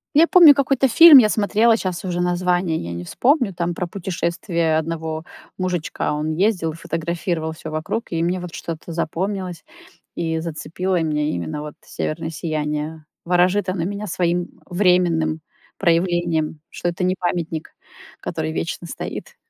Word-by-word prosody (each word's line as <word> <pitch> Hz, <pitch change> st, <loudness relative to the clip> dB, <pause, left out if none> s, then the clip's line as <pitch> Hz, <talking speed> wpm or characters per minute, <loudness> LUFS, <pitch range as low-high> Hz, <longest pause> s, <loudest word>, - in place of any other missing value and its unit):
Я 325 Hz, +3 st, +7 dB
помню 345 Hz, -6 st, +9 dB
какой-то 275 Hz, -1 st, +2 dB
фильм 320 Hz, +4 st, +9 dB
я 235 Hz, -5 st, +7 dB
смотрела, 220 Hz, +2 st, +3 dB
щас 185 Hz, -4 st, -3 dB
уже 175 Hz, -1 st, -1 dB
название 180 Hz, -1 st, +1 dB
я 85 Hz, -, -5 dB
не 85 Hz, +1 st, -5 dB
вспомню, 245 Hz, -, +1 dB
там 175 Hz, -1 st, -2 dB
про 180 Hz, +1 st, -3 dB
путешествие 170 Hz, -2 st, -1 dB
одного 160 Hz, 0 st, -3 dB, 0.3 s
мужичка. 180 Hz, -6 st, -2 dB
Он 155 Hz, +1 st, -2 dB
ездил, 180 Hz, -4 st, +1 dB
фотографировал 165 Hz, 0 st, -3 dB
всё 160 Hz, 0 st, -8 dB
вокруг, 155 Hz, +9 st, -3 dB
и 165 Hz, 0 st, -1 dB
мне 180 Hz, +2 st, 0 dB
вот 175 Hz, -2 st, -8 dB
что-то 165 Hz, 0 st, -6 dB
запомнилось 180 Hz, +2 st, -3 dB, 0.5 s
и 160 Hz, -1 st, -1 dB
зацепило 170 Hz, +3 st, -2 dB
меня- 150 Hz, -2 st, 0 dB
именно 85 Hz, -, -4 dB
вот 150 Hz, -1 st, -7 dB
северное 160 Hz, +1 st, -4 dB
сияние. 155 Hz, -1 st, -3 dB, 0.2 s
Ворожит 180 Hz, +3 st, +2 dB
оно 185 Hz, -3 st, -1 dB
меня 205 Hz, +2 st, -4 dB
своим 175 Hz, 0 st, -1 dB
временным 175 Hz, -4 st, +2 dB, 0.4 s
проявлением, 170 Hz, -3 st, +1 dB
что 175 Hz, -, -3 dB
это 175 Hz, +2 st, -4 dB
не 185 Hz, +1 st, +2 dB
памятник, 170 Hz, -3 st, -3 dB, 0.5 s
который 160 Hz, -1 st, -3 dB
вечно 170 Hz, +1 st, -3 dB
стоит. -, -, -7 dB
170 Hz, 145 wpm, -21 LUFS, 160-185 Hz, 0.5 s, помню